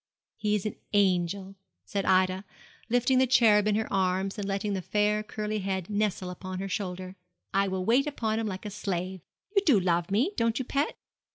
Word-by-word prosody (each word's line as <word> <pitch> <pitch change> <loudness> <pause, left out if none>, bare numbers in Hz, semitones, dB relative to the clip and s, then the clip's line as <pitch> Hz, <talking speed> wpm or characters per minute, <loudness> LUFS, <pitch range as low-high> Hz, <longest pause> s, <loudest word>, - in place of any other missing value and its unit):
'He 210 -1 0
is 210 - -2
an 215 - -3 0.2
angel,' 190 -1 +1 0.3
said 200 -2 -2
Ida, 185 0 +3 0.5
lifting 245 +2 +3
the 260 - +4
cherub 215 -4 +5
in 210 - +3
her 220 +1 0
arms, 190 +2 0
and 200 - -3
letting 200 +1 -1
the 190 - -2
fair, 210 +2 +1
curly 215 -1 -3
head 190 -1 -3
nestle 205 -3 -1
upon 185 +1 -6
her 195 +1 -3
shoulder. 185 -1 -4 0.4
'I 195 +1 +3
will 185 -1 -2
wait 255 +7 +3
upon 225 -6 -1
him 225 - -1
like 190 0 -5
a 210 - -4
slave. 190 -2 -3 0.3
You 395 - +6
do 280 - +5
love 175 -1 +1
me, 235 - +2
don't 230 0 +1
you, 260 - -2
pet?' 280 +4 -1
200 Hz, 195 wpm, -28 LUFS, 185-215 Hz, 0.5 s, You